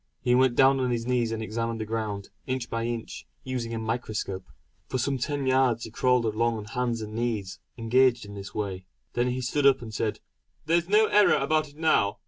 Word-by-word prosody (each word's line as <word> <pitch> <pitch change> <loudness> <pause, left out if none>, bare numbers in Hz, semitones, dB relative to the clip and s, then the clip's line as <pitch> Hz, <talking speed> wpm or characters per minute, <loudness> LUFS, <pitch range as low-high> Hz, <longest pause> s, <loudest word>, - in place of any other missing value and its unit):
He 125 -2 +1
went 130 -1 +4
down 135 0 +5
on 130 -1 0
his 115 -1 -1
knees 120 -2 +1
and 110 0 -3
examined 115 +1 -3
the 110 - -3
ground, 105 -3 -3 0.2
inch 130 -2 -3
by 115 0 -1
inch, 120 -1 -5 0.2
using 125 -3 -3
a 115 - -2
microscope. 110 -4 -3 0.4
For - - -2
some 135 +1 -1
ten 140 +2 -2
yards 130 -3 +2
he 115 - -7
crawled 125 0 +2
along 115 +1 +1
on 105 - -6
hands 120 0 -2
and 105 0 -7
knees 110 -4 -2 0.2
engaged 120 +1 +3
in 100 - -10
this 100 -1 -8
way. 95 -3 -3 0.3
Then 120 +1 +1
he 125 +1 -1
stood 140 +3 +2
up 135 -1 +5
and 110 -2 -9
said: 110 0 -2 0.5
"There's 170 +2 +1
no 215 +2 +5
error 210 -1 +5
about 155 +2 +1
it 145 - -20
now. 155 -11 +2
120 Hz, 210 wpm, -27 LUFS, 110-130 Hz, 0.5 s, down